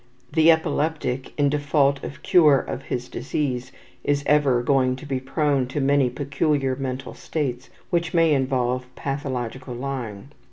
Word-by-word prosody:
The 160 0 +5
epileptic, 155 -5 +1
in 145 -1 +4
default 140 -1 +1
of - - -8
cure 155 -6 +6
of 130 - -4
his 125 0 -3
disease, 130 -4 -3 0.3
is 145 0 +1
ever 140 -5 +3
going 130 -1 +2
to 130 - -10
be 135 -2 -2
prone 135 0 0
to 135 +3 -3
many 140 -1 +3
peculiar 140 0 0
mental 130 0 -4
states 135 -5 -3 0.2
which 170 -1 0
may 165 -2 +4
involve 130 -2 0
pathological 130 -3 -4
lying. 125 -4 -5
135 Hz, 145 wpm, -24 LUFS, 130-145 Hz, 0.3 s, cure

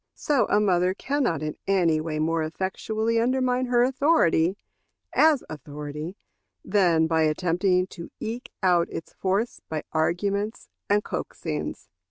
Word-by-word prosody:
So 285 -4 +1
a 205 - +4
mother 185 -2 +2
can 285 +7 -1
not 165 - 0
in 155 -1 -4
any 170 -5 +3
way 155 -1 -3
more 160 +1 +1
effectually 215 +7 -1
undermine 255 +1 +1
her 240 -1 +4
authority, 250 - +3 0.6
as 310 -4 +4
authority, 150 +3 -7 0.5
than 175 -6 +3
by 160 0 +2
attempting 180 +4 +2
to 170 -2 -8
eke 230 +3 -5
out 175 -2 +4
its 165 - -7
force 195 +5 -1
by 155 -1 -3
arguments 200 +7 -1 0.2
and 205 +1 +3
coaxings. - - -4
185 Hz, 135 wpm, -25 LUFS, 160-230 Hz, 0.6 s, a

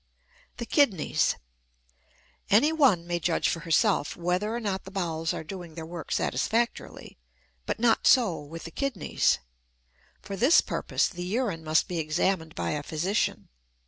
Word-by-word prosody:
THE 235 - -4
KIDNEYS. 230 - +2 1.1
Any 245 +10 +5
one 255 - +3
may 175 0 -2
judge 170 0 +1
for 165 - -2
herself 160 -2 +1
whether 180 +5 -1
or 235 - -2
not 200 -4 -3
the 190 - -10
bowels 165 -4 -2
are - - -4
doing 175 -1 -8
their 165 -1 -6
work 170 0 -8
satisfactorily, 235 - -2 0.5
but - - -1
not 230 -1 +3
so 215 -11 +4
with 155 +3 -9
the 165 - -8
kidneys. 255 - 0 0.8
For 200 - -7
this 255 - +5
purpose - - 0
the 175 -2 -8
urine 190 -2 -2
must 155 0 +2
be 175 -2 -3
examined 160 +1 -1
by - - -2
a 150 - -2
physician. 165 +8 -1
180 Hz, 150 wpm, -27 LUFS, 165-220 Hz, 1.1 s, Any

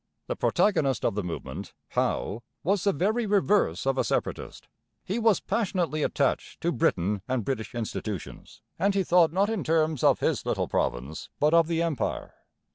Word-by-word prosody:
The - - -3
protagonist 140 - +1
of - - +2
the 105 - -1
movement, 80 -6 -6
Howe, 110 +4 -1 0.2
was 195 +2 +1
the 200 - +4
very 215 +8 0
reverse 200 - +2
of 135 -1 +1
a - - +3
separatist. - - -3 0.4
He 200 +6 -2
was 225 -5 +4
passionately 185 -7 -1
attached 140 -2 0
to 170 - +1
Britain 100 - +1
and 130 -5 -1
British 120 -3 -3
institutions, 110 -3 -5 0.2
and 200 +3 +2
he 195 - +2
thought 170 -2 +4
not 200 +5 +1
in 220 -6 -2
terms 155 -3 +1
of - - +5
his - - 0
little - - -1
province, 65 +6 -2
but 150 +2 +3
of 165 -1 +5
the 165 0 0
Empire. 165 -6 -2
160 Hz, 170 wpm, -27 LUFS, 120-195 Hz, 0.4 s, of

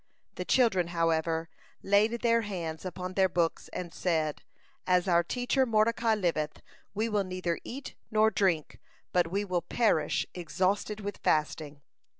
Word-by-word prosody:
The - - -5
children, 205 -9 +3
however, 165 -1 0 0.4
laid 215 +4 +3
their 230 -1 +4
hands 175 -6 -5
upon 185 +1 -5
their 190 0 +3
books, 170 -2 0
and 175 -2 -6
said: 160 -4 -1 0.5
"As 180 0 +3
our 170 -2 +5
teacher 245 +7 +1
Mordecai 225 -1 +2
liveth, 165 -6 -1 0.3
we 220 +3 0
will 210 -3 +1
neither 185 -2 -2
eat 275 +3 -7 0.2
nor 220 0 +4
drink, 180 -8 0 0.3
but 180 -2 +3
we 200 +3 -1
will 180 -3 0
perish 170 -4 +1
exhausted 190 +5 -1
with 205 0 -5
fasting." 150 -2 -1
185 Hz, 145 wpm, -29 LUFS, 165-215 Hz, 0.5 s, our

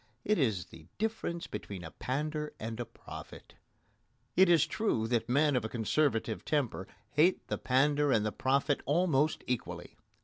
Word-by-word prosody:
It 210 -3 +2
is 110 - +1
the 80 0 -14
difference 215 -6 -2
between 95 -4 -6
a 80 - -8
pander 150 +3 -3
and 110 +1 -5
a 120 - -2
prophet. - - -11 0.8
It 190 0 +6
is 170 -4 +6
true 160 - 0
that 115 -1 0
men 145 +2 +3
of 125 - +1
a 110 - -3
conservative 115 -1 0
temper 125 -10 -1 0.2
hate 165 +6 +3
the - - -2
pander 145 +2 +3
and 110 -4 +3
the 110 - 0
prophet 140 +4 +1
almost 155 -1 +2
equally. 125 -2 -4
135 Hz, 160 wpm, -31 LUFS, 115-155 Hz, 0.8 s, It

